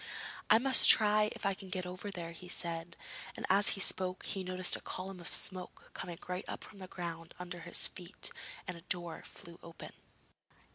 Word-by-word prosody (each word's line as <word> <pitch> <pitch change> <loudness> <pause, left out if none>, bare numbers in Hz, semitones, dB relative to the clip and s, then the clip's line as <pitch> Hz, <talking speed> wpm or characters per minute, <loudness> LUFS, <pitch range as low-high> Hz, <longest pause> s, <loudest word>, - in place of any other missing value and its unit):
'I 215 - +8
must 260 +2 +5
try 215 -1 +6
if - - -8
I 195 - +2
can 190 0 -8
get 185 0 -3
over 185 +3 -5
there,' 170 -4 -6
he 170 +2 -10
said, 170 -1 -3 0.4
and - - -3
as 200 +2 +5
he - - -5
spoke, 185 -1 +4
he 195 - -2
noticed 185 0 +5
a - - -7
column 185 0 -6
of 170 - -8
smoke 185 +3 0
coming 175 -2 -6
right 180 +1 -3
up - - -5
from 200 - -11
the 185 - -8
ground 165 -2 -7
under 180 0 -7
his 170 +1 +3
feet, 180 0 -6 0.4
and 180 - -4
a 170 - -11
door 175 -1 -3
flew 170 0 -11
open. 170 - -10
180 Hz, 195 wpm, -33 LUFS, 170-195 Hz, 0.4 s, I